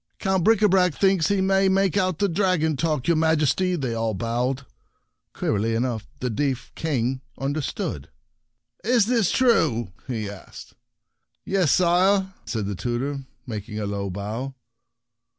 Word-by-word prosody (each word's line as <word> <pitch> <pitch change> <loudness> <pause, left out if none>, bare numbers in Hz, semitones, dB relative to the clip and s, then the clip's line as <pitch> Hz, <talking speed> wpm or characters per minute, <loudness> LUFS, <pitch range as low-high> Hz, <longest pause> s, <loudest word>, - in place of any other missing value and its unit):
" - - -46
Count 190 -2 +1
Bricabrac 190 -5 +4
thinks 190 -4 +3
he 200 -1 +1
may 195 0 +3
make 195 -1 +2
out 185 -4 +1
the 200 - +2
dragon 170 -4 +1
talk, 150 -1 0
yourMajesty!" 160 +2 +2
they 130 -4 -2
all 115 -1 -1
bawled. 125 +5 -1 0.7
Queerly 110 +2 -1
enough 115 -2 -2
the 125 - -1
deaf 135 +2 -2
King 130 -4 -1 0.2
understood. 135 - -3 0.4
" - - -44
Is 235 -5 +5
this 230 -5 +2
true? 155 - +2
" - - -31
he 110 -5 -3
asked. 100 -2 -11 0.7
"Yes, 190 -6 +2
sire," 190 +2 +3
answered 110 -4 -3
the 100 - -2
tutor, 130 +7 -3 0.2
making 105 -2 -5
a 105 - -2
low 100 -1 -3
bow. 110 +8 -5
145 Hz, 145 wpm, -24 LUFS, 115-190 Hz, 0.7 s, Is